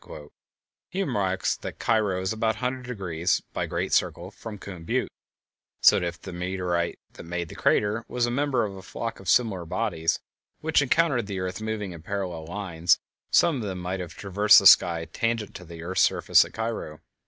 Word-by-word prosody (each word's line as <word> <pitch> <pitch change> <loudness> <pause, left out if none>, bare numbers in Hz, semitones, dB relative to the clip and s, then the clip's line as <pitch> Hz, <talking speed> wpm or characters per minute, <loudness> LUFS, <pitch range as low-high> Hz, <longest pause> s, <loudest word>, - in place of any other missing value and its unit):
He 190 +2 -1
remarks 95 - 0
that - - -7
Cairo 105 -5 +1
is 95 +3 -1
about 110 0 0
100°, 110 -10 -2
by - - -2
great - - -2
circle, 90 +3 0
from 105 0 -8
Coon 95 -4 -9
Butte, - - -1 0.7
so - - +6
that 90 - -1
if 85 0 -6
the 95 - -9
meteorite 90 -1 -2 0.2
that - - -10
made 85 0 -4
the - - -10
crater 105 +2 +1
was 125 -1 0
a 120 - -2
member 135 -2 +1
of 100 -2 -6
a 95 - -9
flock 115 +4 -5
of 95 -2 -6
similar 100 -5 +2
bodies 80 0 -1 0.4
which 160 -1 +2
encountered 140 -5 +2
the 100 -2 -4
earth 95 +2 -4
moving 110 -3 -3
in 85 -2 -9
parallel 90 -3 -4
lines, 85 -3 +1 0.3
some 165 -5 +4
of - - -4
them 95 -4 -4
might 90 +1 -3
have 85 -2 -7
traversed 105 +1 +5
the - - +5
sky 85 -1 +7
tangent 115 0 -2
to 90 - -9
the 85 0 -9
earth's 95 +2 0
surface - - +5
at - - -11
Cairo. 110 -9 -4
95 Hz, 190 wpm, -26 LUFS, 90-115 Hz, 0.7 s, sky